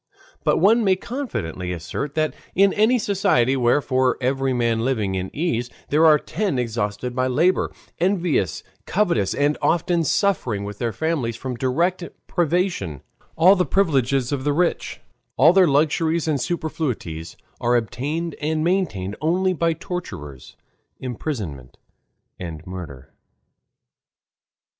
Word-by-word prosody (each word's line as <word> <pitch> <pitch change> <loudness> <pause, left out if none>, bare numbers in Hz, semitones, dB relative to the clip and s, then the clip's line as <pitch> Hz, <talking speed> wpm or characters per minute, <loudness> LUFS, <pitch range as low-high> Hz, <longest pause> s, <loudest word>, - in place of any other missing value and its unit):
But - - +3
one 225 +6 +4
may 190 -2 +4
confidently 140 - -4
assert 90 - -4
that 155 -1 +1 0.2
in 195 +1 +4
any 220 +4 +3
society 180 - +2
where, 125 +3 +2
for 130 -2 +1
every 135 +1 0
man 115 -2 +1
living 115 -5 0
in 95 0 -2
ease, 125 -7 -1 0.2
there 155 +3 +5
are 155 -1 +7
ten 185 0 -2
exhausted 120 0 -2
by 130 0 +1
labor, 160 +9 +2 0.3
envious, 175 - 0 0.2
covetous, 170 - +1
and 145 +1 +1
often 170 0 +2
suffering 135 - 0
with 105 0 -7
their 120 -1 -1
families 145 -6 -1
from 130 +2 -5
direct 170 +10 0 0.2
privation, 170 - -1 0.3
all 180 +5 +6
the 180 - +2
privileges 135 -7 +1
of 140 -2 -2
the 145 +1 +1
rich, 175 +3 -1 0.4
all 160 +6 +7
their 190 -2 +6
luxuries 160 +3 +1
and 145 -4 0
superfluities, 130 - -3 0.2
are 120 +1 +2
obtained 145 +8 -2
and 155 +1 0
maintained 155 - 0
only 185 +4 +2
by 165 -1 +1
tortures, 160 - -7 0.4
imprisonment, 105 - -5 0.6
and 85 -2 -7
murder. 85 -9 -9
140 Hz, 130 wpm, -22 LUFS, 115-175 Hz, 0.6 s, are